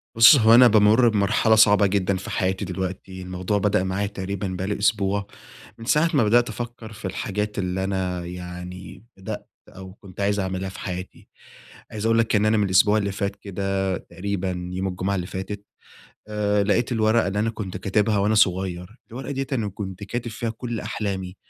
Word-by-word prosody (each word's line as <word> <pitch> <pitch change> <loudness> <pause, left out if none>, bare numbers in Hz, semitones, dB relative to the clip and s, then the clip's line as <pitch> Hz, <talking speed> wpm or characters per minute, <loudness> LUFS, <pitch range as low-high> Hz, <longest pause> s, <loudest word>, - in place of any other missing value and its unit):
بُص 115 +5 +9
هو 115 -3 +6
أنا 125 +1 +8
بامر 110 +2 +5
بمرحلة 110 +1 +3
صعبة 105 -2 +6
جدًا 95 -1 0
في 95 - -8
حياتي 95 +1 -1
دلوقتي، 95 +1 -5
الموضوع 90 +2 -2
بدأ 100 -1 +1
معايا 95 +2 -1
تقريبًا 100 -1 -4
بقى 95 0 -4
لي 105 - -2
أسبوع، 100 -1 +1 0.5
من 115 - -10
ساعة 150 +7 +3
ما 135 -6 +4
بدأت 120 +3 +3
أفكر 120 0 -7
في 105 - -10
الحاجات 105 +2 -3
اللي 95 0 -2
أنا 95 -2 -2
يعني 90 +2 -8
بدأت 95 - -7 0.2
أو 95 0 -11
كنت 100 -1 -11
عايز 100 +1 +1
أعملها 95 0 -3
في - - -10
حياتي، 90 -1 -7 0.6
عايز 105 0 -4
أقول 115 0 +3
لك 115 -1 +2
إن 105 - +3
أنا 110 +1 +3
من 105 - +2
الأسبوع 100 +3 +4
اللي 100 -2 -1
فات 100 0 -3
كده 95 -1 -2
تقريبًا 90 -2 -4
يوم 95 +1 -2
الجمعة 95 +2 -2
اللي 90 -2 -3
فاتت 100 +2 -6 0.6
آآ، 105 -1 +1
لقيت 115 +5 +1
الورقة 110 0 +2
اللي 100 +1 -2
أنا 110 +2 +1
كنت 100 -5 -6
كاتبها 105 +3 +1
وأنا 105 +2 +2
صغير، 95 0 0
الورقة 130 +4 -7
ديّة 135 0 -3
أنا 115 -6 0
كنت 95 0 -7
كاتب 120 +3 -4
فيها 115 +1 -3
كل 115 0 -5
أحلامي، 100 -3 -4
100 Hz, 185 wpm, -23 LUFS, 95-110 Hz, 0.6 s, بُص